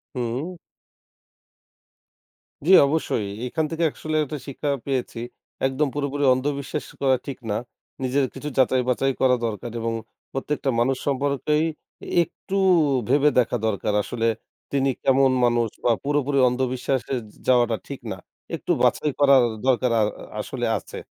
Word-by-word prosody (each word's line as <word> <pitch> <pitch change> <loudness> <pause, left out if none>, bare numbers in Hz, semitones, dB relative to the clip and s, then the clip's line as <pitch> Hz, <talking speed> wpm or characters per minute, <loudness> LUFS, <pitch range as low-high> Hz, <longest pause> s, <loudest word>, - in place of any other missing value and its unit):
হুম। 125 +9 -3 2.1
জ্বি 190 - +5
অবশ্যই। 140 -8 0 0.2
এখান 155 +5 -1
থেকে 165 +1 0
আসলে 155 0 -3
একটা 150 +1 -5
শিক্ষা 145 +1 -3 0.2
পেয়েছি। 125 -3 -2 0.5
একদম 135 +3 +1
পুরোপুরি 145 0 -1
অন্ধবিশ্বাস 140 +2 -3 0.2
করা 130 -1 +4
ঠিক 135 -2 -5
না। 105 - 0 0.5
নিজের 135 +2 +2
কিছু 150 - -5
যাচাই-বাচাই 130 +1 +2
করা 125 -1 +4
দরকার 110 +2 -4
এবং 115 0 -1 0.4
প্রত্যেকটা 135 0 -1
মানুষ 130 +2 +2
সম্পর্কেই 140 +3 +1 0.6
একটু 195 +3 -6 0.5
ভেবে 145 +2 +4
দেখা 120 - +2
দরকার 105 0 0
আসলে 115 +1 -2 0.5
তিনি 135 -1 +2
কেমন 135 0 +4
মানুষ 120 -1 +2 0.2
বা 120 - +5
পুরোপুরি 145 -1 +1
অন্ধবিশ্বাসে 130 +1 -1
যা 110 -3 -12
যাওয়াটা 120 -3 +4
ঠিক 140 - -6
না। 95 - -7 0.4
একটু - - -5
বাছাই 150 - +2
করার 140 -2 +7 0.2
দরকার 125 -1 +3
আ - - +4
আ - - +4 0.4
আসলে - - -3
আছে। - - -10
135 Hz, 135 wpm, -24 LUFS, 125-145 Hz, 2.1 s, করার